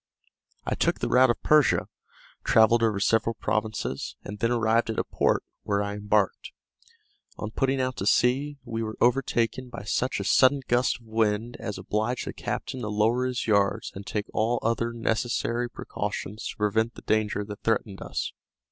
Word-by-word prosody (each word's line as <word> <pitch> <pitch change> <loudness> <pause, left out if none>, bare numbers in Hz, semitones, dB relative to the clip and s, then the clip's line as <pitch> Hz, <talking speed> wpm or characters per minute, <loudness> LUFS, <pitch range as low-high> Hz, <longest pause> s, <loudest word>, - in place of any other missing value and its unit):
I - - -1
took - - +1
the - - -1
route 130 0 +5
of 120 - -1
Persia, 150 -2 +4 0.6
travelled 110 +1 +5
over 110 -3 +2
several 115 +2 +2
provinces, 110 -11 -2
and 105 +1 -7
then 115 - +1
arrived 115 -1 +2
at 110 - -2
a - - +2
port, - - +1 0.2
where 100 0 0
I 100 0 -3
embarked. 105 -1 0 0.8
On 105 - -5
putting 135 +3 0
out 130 -2 -1
to 95 - -2
sea, 135 +6 +2
we 115 -1 -3
were 110 -1 -4
overtaken 125 0 +1
by 120 - -8
such 130 +5 -1
a - - -2
sudden 135 +1 +4
gust 120 0 +2
of 115 - -21
wind 110 +1 0
as 110 -3 -5
obliged 110 +4 -2
the - - -5
captain 130 -1 -4
to 105 - -3
lower 115 +5 +2
his 125 -1 -2
yards 100 0 +1
and 95 - -8
take 105 -1 -2
all 115 +3 +1
other 115 +1 0
necessary 115 +1 -1
precautions 105 -1 -5
to - - -7
prevent 110 +2 +1
the - - -11
danger 105 -1 0
that 105 0 -8
threatened 105 -3 -1
us. - - -3
115 Hz, 175 wpm, -26 LUFS, 105-120 Hz, 0.8 s, route